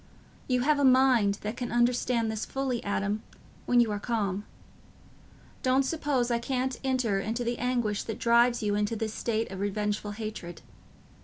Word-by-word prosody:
You 250 -1 +1
have 295 +2 +3
a - - +2
mind 255 -6 +5
that 210 +2 -4
can 245 -2 -4
understand 240 -1 +1
this 220 0 -3
fully, 265 -3 -2
Adam, 205 +1 -1 0.5
when 245 - +4
you 235 -3 +3
are 205 - -2
calm. 205 -3 -2 1.2
Don't 260 +1 +3
suppose 270 -5 0
I 235 - +2
can't 255 +1 -2
enter 250 -7 +1
into 225 +4 -2
the 235 0 -2
anguish 240 -4 0
that 225 - -4
drives 235 0 +3
you 205 -1 +1
into 210 +2 0
this 220 0 -3
state 225 -2 -2
of 190 - -6
revengeful 205 +1 -2
hatred. 210 -6 -7
235 Hz, 165 wpm, -28 LUFS, 210-250 Hz, 1.2 s, mind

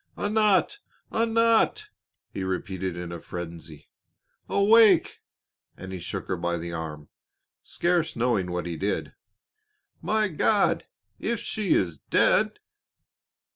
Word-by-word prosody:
"Anat! 210 - +2 0.3
Anat!" 230 - +2 0.4
he 95 - -4
repeated 95 -1 -3
in 85 -1 -6
a 85 - -6
frenzy. 85 -3 -9 0.6
"Awake!" 205 -3 +5 0.6
and 95 0 -8
he 95 - -5
shook 95 +2 -5
her 95 - -2
by 85 0 -1
the 85 0 -6
arm, 75 -2 -6 0.5
scarce 170 -2 0
knowing 115 -6 0
what 90 -1 -3
he 85 -2 -4
did. 100 +4 -2 0.9
"My 215 0 +1
God! 200 +4 +1 0.3
if 235 -2 -1
she 215 -4 0
is 85 -6 0
dead!" - - +2
100 Hz, 115 wpm, -26 LUFS, -, 0.9 s, Awake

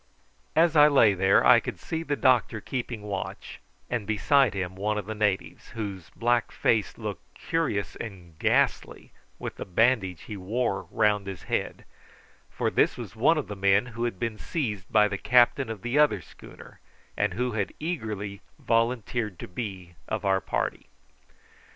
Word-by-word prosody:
As 165 0 +4
I 150 -1 +8
lay 125 -8 +5
there 95 +1 +3
I - - +8
could - - -6
see 160 - -4
the 145 -3 -1
doctor 125 -5 +2
keeping 120 -2 -5
watch, 100 -2 -6 0.3
and 115 -5 -3
beside 110 +2 +3
him 95 -1 -3
one 105 +2 -1
of 105 - -3
the 110 - -4
natives, 105 -2 -1
whose 100 -6 -5
black 120 0 +1
face 110 -5 0
looked - - -7
curious 160 - -2
and 90 -7 -9
ghastly - - 0 0.3
with - - -6
the - - -4
bandage 95 -3 +1
he 105 - -7
wore 100 -1 -2
round 105 -2 +1
his 95 -3 -7
head, - - -3 0.6
for - - -1
this - - +2
was - - -8
one 150 +9 +3
of 150 - -2
the 105 - -6
men 100 +2 +3
who 115 +2 -2
had 120 -6 -3
been 110 0 -3
seized 105 - -3
by 105 -1 +5
the 100 -2 -4
captain 125 0 +4
of 110 -4 -6
the 120 +5 +1
other 150 -1 +4
schooner, - - -14 0.4
and - - 0
who 125 +2 -1
had 105 -3 -2
eagerly 105 - -4 0.2
volunteered 115 -3 0
to - - -8
be 95 -3 -6
of 110 -1 -3
our 95 -1 +2
party. - - -3
110 Hz, 170 wpm, -27 LUFS, 100-120 Hz, 0.6 s, I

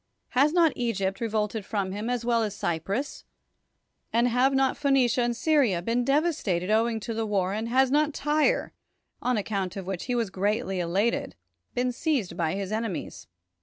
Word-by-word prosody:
Has 280 +4 +3
not 330 -3 +4
Egypt 195 -5 -1
re 230 - 0
volted 215 0 -1
from 195 -2 -2
him, 210 +4 -4
as 245 -1 -2
well 235 -1 +2
as 210 -2 -2
Cyprus; 195 - -3 0.9
and 235 +2 +3
have 250 +3 +3
not 270 -1 +2
Phoenicia 265 -4 +2
and 240 -1 0
Syria 280 - +2
been 235 +5 +1
devastated 270 - +1
owing 225 +1 +2
to 230 - -4
the 225 0 -2
war; 195 -2 0
and 220 +2 -3
has 260 +1 +3
not 300 +1 +3
Tyre, 300 +1 +1 0.5
on 250 -2 +1
account 195 -3 -2
of 195 - -5
which 190 -2 -4
he 245 - -1
was 230 -5 -1
greatly 200 0 -1
elated, 180 - 0 0.4
been 250 +1 +1
seized 250 - -1
by 165 0 -1
his 195 0 -4
enemies? 220 -4 -4
230 Hz, 175 wpm, -27 LUFS, 195-255 Hz, 0.9 s, not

